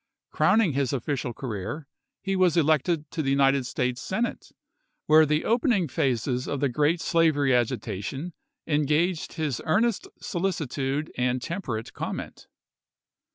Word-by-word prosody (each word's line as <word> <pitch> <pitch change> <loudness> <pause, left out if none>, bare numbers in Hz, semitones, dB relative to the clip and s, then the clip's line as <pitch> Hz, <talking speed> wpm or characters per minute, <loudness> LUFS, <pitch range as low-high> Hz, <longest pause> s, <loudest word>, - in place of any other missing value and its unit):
Crowning 215 -9 +3
his 135 -1 0
official 135 -1 -2
career, 120 +5 -5 0.4
he 195 0 -1
was 180 -3 +3
elected 155 0 +2
to 165 - -2
the 135 - -1
United 135 -1 +3
States 125 0 -2
Senate, 230 +5 -3 0.5
where 155 0 +6
the 150 +1 +1
opening 230 - +2
phases 125 -1 -1
of 140 - -2
the 140 - +1
great 150 +7 +1
slavery 155 -6 +2
agitation 125 - -2 0.3
engaged 155 +3 +1
his 155 -7 -2
earnest 215 +6 +1
solicitude 155 -5 -2
and 125 0 +1
temperate 130 - -4
comment. - - -6
150 Hz, 125 wpm, -26 LUFS, 130-170 Hz, 0.5 s, where